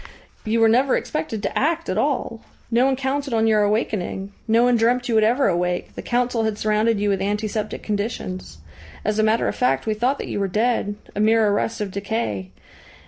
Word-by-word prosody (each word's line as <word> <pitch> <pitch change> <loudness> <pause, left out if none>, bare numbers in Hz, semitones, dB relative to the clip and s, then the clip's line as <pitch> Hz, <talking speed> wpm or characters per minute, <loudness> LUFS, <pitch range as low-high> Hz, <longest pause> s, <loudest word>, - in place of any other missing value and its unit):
"You 225 +1 +1
were 225 - +6
never 255 +4 +3
expected 230 -9 -4
to - - -2
act 330 +3 0
at 185 - -1
all. 245 -1 -1 0.3
No 240 +3 +4
one 270 - +2
counted 270 0 -2
on 225 0 +2
your 215 -1 +3
awakening. 205 -2 -1 0.2
No 230 +1 +4
one 245 0 +4
dreamt 245 +2 +2
you 235 - -1
would 220 -1 +4
ever 245 +6 +3
awake. 175 0 -1
The - - -7
Council 240 -1 0
had 220 -1 -1
surrounded 215 +1 +1
you 205 - 0
with 195 -1 0
antiseptic 210 +1 -2
conditions. 205 - -4 0.5
As 215 +1 0
a - - +4
matter 220 +1 +2
of - - -2
fact, 250 - +1
we 220 - +1
thought 245 +6 0
that - - -6
you - - -3
were 200 - 0
dead 210 +1 0 0.2
a - - -3
mere 220 +1 +4
arrest 210 +2 0
of 200 -2 -3
decay. 200 - -3
220 Hz, 205 wpm, -22 LUFS, 205-240 Hz, 0.5 s, were